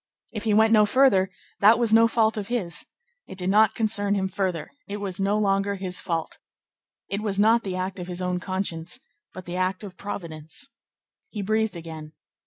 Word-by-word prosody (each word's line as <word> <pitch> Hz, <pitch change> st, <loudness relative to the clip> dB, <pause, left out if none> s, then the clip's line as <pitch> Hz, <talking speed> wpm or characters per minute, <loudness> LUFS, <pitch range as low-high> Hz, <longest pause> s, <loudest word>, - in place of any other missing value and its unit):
If 215 Hz, -1 st, -6 dB
he 215 Hz, -, +2 dB
went 220 Hz, +1 st, +5 dB
no 210 Hz, -1 st, +6 dB
further, 205 Hz, -6 st, +4 dB, 0.3 s
that 210 Hz, +3 st, +7 dB
was 230 Hz, -2 st, +2 dB
no 230 Hz, +1 st, +7 dB
fault 225 Hz, -1 st, +2 dB
of 205 Hz, -2 st, -4 dB
his. 220 Hz, -9 st, -2 dB, 0.4 s
It 190 Hz, -, -10 dB
did 185 Hz, 0 st, -1 dB
not 215 Hz, +1 st, +5 dB
concern 205 Hz, -2 st, +1 dB
him 190 Hz, -1 st, 0 dB
further. 185 Hz, -4 st, -2 dB, 0.2 s
It 205 Hz, -, -4 dB
was 200 Hz, -2 st, -5 dB
no 200 Hz, +2 st, +1 dB
longer 200 Hz, -1 st, +1 dB
his 185 Hz, -2 st, -3 dB
fault. 165 Hz, -2 st, -3 dB, 0.7 s
It 200 Hz, +1 st, -3 dB
was 205 Hz, -2 st, -2 dB
not 225 Hz, +3 st, +5 dB
the 190 Hz, -4 st, -4 dB
act 185 Hz, +1 st, -3 dB
of 180 Hz, -, -6 dB
his 180 Hz, -1 st, -4 dB
own 180 Hz, 0 st, -1 dB
conscience, 185 Hz, +2 st, -3 dB, 0.3 s
but 185 Hz, -, -9 dB
the 175 Hz, +1 st, -5 dB
act 185 Hz, +2 st, -1 dB
of 190 Hz, -3 st, -9 dB
Providence. 170 Hz, -, -6 dB, 0.6 s
He 210 Hz, -3 st, -5 dB
breathed 220 Hz, 0 st, 0 dB
again. 160 Hz, -2 st, -8 dB
195 Hz, 190 wpm, -25 LUFS, 180-215 Hz, 0.7 s, that